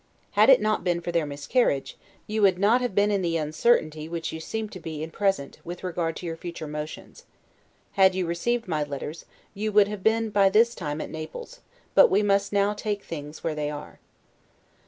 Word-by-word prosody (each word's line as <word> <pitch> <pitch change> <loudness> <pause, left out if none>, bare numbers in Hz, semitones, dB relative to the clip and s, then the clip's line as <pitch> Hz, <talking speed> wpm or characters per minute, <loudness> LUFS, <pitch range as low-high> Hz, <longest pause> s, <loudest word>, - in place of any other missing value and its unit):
Had 215 +4 +5
it 265 - +8
not 215 0 0
been 175 -2 +1
for 175 0 -4
their 165 -3 0
miscarriage, 145 - 0 0.3
you 215 +1 -2
would 195 -3 +4
not 215 +6 +3
have, 245 -6 -2
been 205 +1 +3
in 200 -2 +1
the 170 -2 0
uncertainty 155 -1 +1 0.2
you 160 - -6
seem 220 +7 -4
to 185 - -9
be 155 -2 -6
in 160 - -5
at - - -24
present, 195 -9 -1
with 175 +2 -8
regard 170 -2 -2
to - - -7
your 165 -1 -3
future 170 -1 -7
motions. 150 +1 -7 0.7
Had 190 -1 +4
you 185 -1 0
received 230 +8 -1
my 155 -4 0
letters, 145 +2 -6 0.3
you 215 +2 -2
would 205 -1 +5
have 210 -1 -6
been 220 +1 +1
by 200 -1 +4
this 230 +4 +4
time 150 -5 -4
at - - -6
Naples: 320 - -8 0.3
but - - +7
we 210 - +3
must 200 0 +2
now 200 0 +2
take 205 -1 -3
things 150 -1 -8
where 165 - -1
they 150 -1 -2
are. 150 0 -8
185 Hz, 205 wpm, -26 LUFS, 155-210 Hz, 0.7 s, it